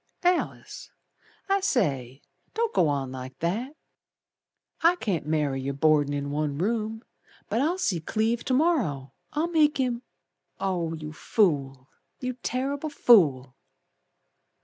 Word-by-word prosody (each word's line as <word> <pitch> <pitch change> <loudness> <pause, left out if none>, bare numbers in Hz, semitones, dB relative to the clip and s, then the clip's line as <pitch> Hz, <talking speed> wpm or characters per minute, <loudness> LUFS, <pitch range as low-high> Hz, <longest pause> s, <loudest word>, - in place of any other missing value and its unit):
"Alice, 360 +7 -1 0.6
I 395 0 +3
say, 140 - -1 0.3
Don't 460 0 0
go 165 - +3
on 140 -3 -1
like 130 0 -8
that. 225 - -2 1.1
I 335 +2 +5
can't 185 - -2
marry 150 -4 0
yer 140 +1 -2
Boardin' 145 0 +3
in 140 0 -3
one 145 -1 -1
room, 220 +4 -1 0.5
But 230 - +1
I'll 330 +6 +1
see 200 - 0
Cleve 220 +8 -1
to 255 - +1
morrer, 225 - +1 0.2
I'll 320 +3 0
make 310 -2 +3
him 250 -3 0 0.3
" - - -48
"Oh, 175 -4 -1
you 155 -1 -7
fool! 140 - 0 0.3
You 255 0 -3
terrible 270 +5 -3
fool!" 145 - +4
190 Hz, 130 wpm, -26 LUFS, -, 1.1 s, I